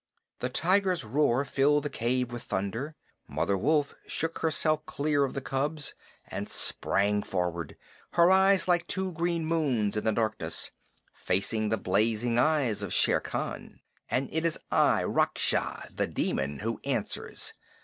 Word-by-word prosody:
The 125 - -2
tiger's 185 +5 +2
roar 135 +3 +2
filled 145 +2 +2
the 145 - -2
cave 125 0 -1
with 120 -1 -5
thunder. 115 +11 -3 0.3
Mother 100 - 0
Wolf 145 +7 +1
shook 165 +1 -2
herself 155 -1 +1
clear 145 0 +1
of 135 - -6
the 140 - -2
cubs 145 +3 -2 0.3
and - - -5
sprang 105 +1 +2
forward, 90 -5 -3 0.4
her 170 +1 +5
eyes, 190 -1 +5
like 175 -1 +2
two 190 0 -2
green 170 0 -1
moons 135 -11 +1
in 105 - -1
the 110 - +2
darkness, 110 0 -2 0.4
facing 105 +3 0
the 110 - +1
blazing 110 +5 +1
eyes 140 -5 +2
of - - -1
Shere - - +4
Khan. - - -5 0.3
"And 130 +1 0
it 160 +1 0
is 165 -1 0
I, - - +4
Raksha - - 0
[The - - 0
Demon], 70 +1 -1
who - - -3
answers. - - -2
135 Hz, 150 wpm, -29 LUFS, 110-160 Hz, 0.4 s, her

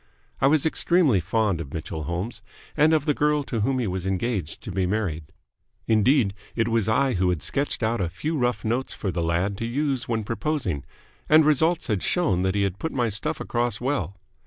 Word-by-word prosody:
I 135 - +4
was 150 +1 +3
extremely 160 - +3
fond 100 0 0
of 70 -2 -8
Mitchell 80 -1 -5
Holmes 90 +8 -4 0.3
and 155 +1 +4
of 155 -3 +2
the 150 - +2
girl 150 0 +1
to 120 -4 -3
whom 130 +5 +1
he 125 - 0
was 95 -1 -3
engaged 95 -4 -2
to - - -6
be 90 0 0
married. 90 -6 -2 0.6
Indeed, 110 -1 +3 0.2
it 115 -1 +1
was 115 -2 +1
I 130 +3 +2
who 90 -1 +1
had 90 -4 -1
sketched 140 -3 -1
out 110 -1 +1
a 85 - 0
few 150 - -3
rough 125 -4 0
notes 120 +4 -1
for 95 - -3
the 85 - -2
lad 85 +4 0
to 115 - -2
use 135 0 -1
when 110 -2 0
proposing; 115 - -2 0.4
and 155 0 +7
results 160 +3 +3
had 105 -5 -1
shown 160 - +1
that 95 +1 0
he 100 - +2
had 100 -1 -2
put 160 - -3
my 120 -3 0
stuff 105 -1 -2
across 120 -2 -1
well. 120 - -2
115 Hz, 205 wpm, -25 LUFS, 95-140 Hz, 0.6 s, and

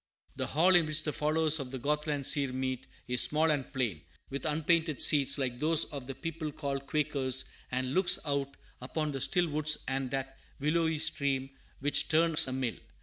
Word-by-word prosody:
The - - -3
hall 175 +6 +3
in 170 -3 +4
which 155 0 +1
the 150 - -2
followers 155 +1 +2
of 135 -2 -5
the 130 - -6
Gothland 150 +1 -1
seer 140 -1 +2
meet 130 -1 -4 0.2
is 125 0 +3
small 155 +1 +3
and 140 -4 -3
plain, 115 - -2 0.3
with 140 +3 -3
unpainted 160 0 0
seats, 140 -1 +4
like 125 -3 -3
those 155 +2 +3
of 135 -3 -7
"the 135 - -6
people 155 +2 -5
called 140 -2 -5
Quakers," 140 -4 0 0.2
and 130 +1 -2
looks 185 +1 +4
out 140 -1 -2 0.2
upon 150 +4 -3
the 135 -2 -5
still 175 +4 +2
woods 155 0 +2
and 135 -1 -2
that 135 0 -5 0.2
"willowy 160 +2 0
stream 140 -3 0 0.3
which 145 +1 +1
turns 160 -1 +4
a - - -4
mill." 130 -3 -2
145 Hz, 185 wpm, -30 LUFS, 135-155 Hz, 0.3 s, in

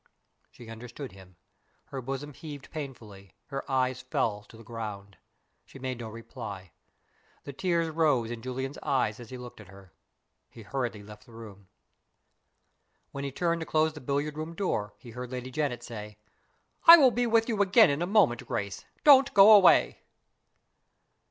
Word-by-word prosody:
She 120 - -15
understood 120 +3 -9
him. 95 -1 -16 0.5
Her 135 - -5
bosom 135 +3 -6
heaved 145 -1 -10
painfully; 110 - -9
her 135 -1 -4
eyes 130 -1 0
fell 110 -5 -2
to 115 - -14
the 115 - -13
ground 105 -4 -8 0.5
she - - -15
made 130 -2 -5
no 115 -2 -6
reply. 110 -5 -9 0.7
The 140 - -8
tears 170 +2 0
rose 150 -8 +1
in 120 -1 -6
Julian's 130 +3 -5
eyes 130 -7 0
as 120 -2 -11
he 130 - -8
looked 125 -3 -11
at 105 - -15
her. 95 -2 -16 0.6
He 115 - -13
hurriedly 120 -3 -4
left 105 +3 -14
the 115 - -16
room. 105 -4 -12 1.4
When 140 - -6
he 140 - -4
turned 170 +4 -1
to 160 - -5
close 155 0 +1
the 150 - -10
billiard 145 +3 -2
room 160 +2 -6
door, 105 - -2
he 120 - -13
heard 125 +1 -7
Lady 130 0 -6
Janet 140 -3 -2
say, 105 -3 -9 0.7
"I 335 +1 +13
will 270 -5 +5
be 245 0 0
with 225 0 +2
you 220 -4 0
again 200 -2 +5
in 140 +3 -2
a 175 - -1
moment, 185 - +2
Grace; 100 -1 -4 0.2
don't 275 -2 +7
go 200 +2 +9
away." 205 -3 +6
130 Hz, 170 wpm, -28 LUFS, 110-155 Hz, 1.4 s, I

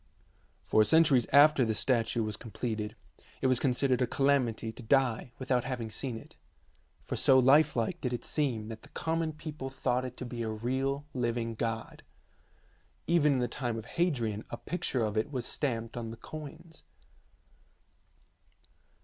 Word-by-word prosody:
For 110 - +4
centuries 135 0 +4
after 145 -1 +7
the 110 -2 0
statue 115 -1 +2
was 105 -1 -3
completed 110 -1 -4 0.4
it - - -3
was 130 -2 +3
considered 130 -1 +1
a 125 - +2
calamity 130 -5 +1
to 110 - -11
die 125 -1 +1
without 130 -2 0
having 125 -4 -4
seen 120 +2 -3
it, - - -14 0.7
for - - -3
so 130 - +5
lifelike 130 -3 +4
did 125 - -1
it 120 - -4
seem 120 -8 -1
that 110 -1 -8
the - - -16
common 160 0 -1
people 155 -3 -7
thought 130 -1 -1
it 125 -1 -7
to 125 - -5
be 120 -1 -5
a 115 - -2
real 130 +6 -2
living 120 -2 -1
god. 115 0 -4 1.0
Even 155 -3 +4
in 130 - +1
the 120 - +1
time 120 -2 -3
of 110 - -6
Hadrian 120 - -1
a 120 - -5
picture 140 -6 -2
of 105 0 -3
it 110 +7 0
was 125 -4 -3
stamped 115 -6 -2
on 115 -2 -4
the 115 - -8
coins. 160 +4 -10
125 Hz, 160 wpm, -30 LUFS, 115-140 Hz, 1.0 s, after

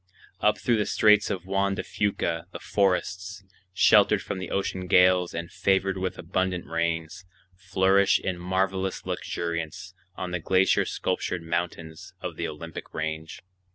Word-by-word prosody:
Up - - +3
through 120 -2 +1
the 105 - 0
Straits 105 -1 +4
of 90 -2 -3
Juan 100 +1 0
de - - -3
Fuca 85 -4 -1
the - - -6
forests, 95 -1 -1 0.3
sheltered 95 - +5
from - - -4
the 95 - -5
ocean 95 -1 -2
gales 90 -1 +4
and 85 +1 -5
favored 95 0 +1
with 95 -1 -3
abundant 90 +1 -2
rains, 85 +1 -2 0.3
flourish 95 +1 +3
in 90 -2 -3
marvelous 95 +1 -1
luxuriance 85 +2 -4 0.2
on 90 -1 -5
the 90 - -1
glacier 95 +3 +3
sculptured 90 -1 -2
mountains 85 -1 -4
of - - -5
the - - -3
Olympic 80 +2 -8
Range. 80 0 -4
90 Hz, 145 wpm, -26 LUFS, 85-95 Hz, 0.3 s, sheltered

